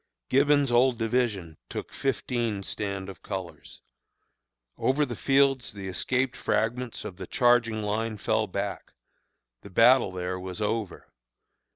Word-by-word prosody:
Gibbon's 140 0 +4
old 120 +1 +4
division 110 -8 -1
took - - -6
fifteen 115 -4 -1
stand 100 -2 -4
of 95 -2 -10
colors. 95 -3 -7 0.9
"Over 145 +3 +1
the 120 -3 -5
fields 135 -1 +2
the 100 -2 -7
escaped 125 +7 -1
fragments 120 +2 -1
of 90 - -7
the - - -7
charging 120 -3 +3
line 110 +1 -2
fell 110 +1 0
back 90 - -4 0.7
the - - -11
battle 115 +2 +5
there 90 0 -3
was 90 -1 -5
over. 105 -2 -3
110 Hz, 130 wpm, -27 LUFS, 100-125 Hz, 0.9 s, battle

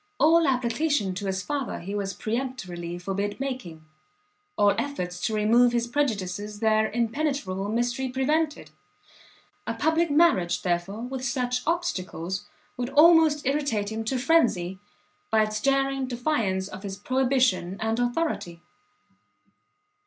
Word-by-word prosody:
All 325 +1 +5
application 250 -3 +1
to 195 +2 -4
his 190 -1 -2
father 285 -1 -3
he 195 +4 -6
was 200 -1 -3
peremptorily 190 -8 -4
forbid 195 +4 -3
making, 250 -13 -5 0.7
all 205 0 +4
efforts 180 -11 -4
to 220 - -2
remove 235 +3 +4
his 235 -1 +1
prejudices 210 -6 -2
their 220 0 +2
impenetrable 230 -5 -1
mystery 240 +3 -1
prevented; 300 +4 -1 1.0
a - - -2
public 320 +1 +1
marriage, 255 - +3
therefore, 180 +4 -1
with 255 +1 -5
such 250 -1 -1
obstacles, 195 - -2 0.3
would 245 0 -2
almost 310 0 +5
irritate 255 -7 0
him 220 0 -3
to 260 +4 -1
phrenzy, 235 - +2 0.5
by 220 -1 +4
its 215 0 -3
daring 270 0 +1
defiance 235 -7 -1
of 190 -1 -9
his 195 -1 -6
prohibition 255 -6 +1
and 225 +1 -1
authority. 245 - -1
235 Hz, 125 wpm, -26 LUFS, 195-275 Hz, 1.0 s, All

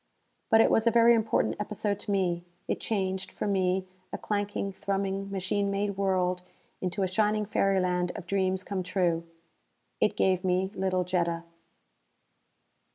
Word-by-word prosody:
But 225 0 +6
it - - +4
was 225 +1 +3
a - - +8
very 235 0 +6
important 225 -1 +1
episode 210 -1 -2
to 205 - -4
me. 180 -3 0 0.2
It - - -1
changed, 190 -3 -2
for - - -4
me, 190 -2 +1 0.2
a - - -3
clanking, 205 -1 -2
thrumming 195 0 -2
machine 200 +1 -1
made 200 0 -1
world 185 -2 +1 0.4
into 185 +1 -1
a - - +2
shining 210 +3 +1
fairyland 185 -3 +1
of 190 - -7
dreams 190 0 0
come 195 -1 -3
true. 175 -2 0 0.7
It - - +1
gave 185 -1 +2
me 185 +1 +1
little 185 -1 0
Jetta. 170 -2 -1
190 Hz, 150 wpm, -28 LUFS, 185-200 Hz, 0.7 s, a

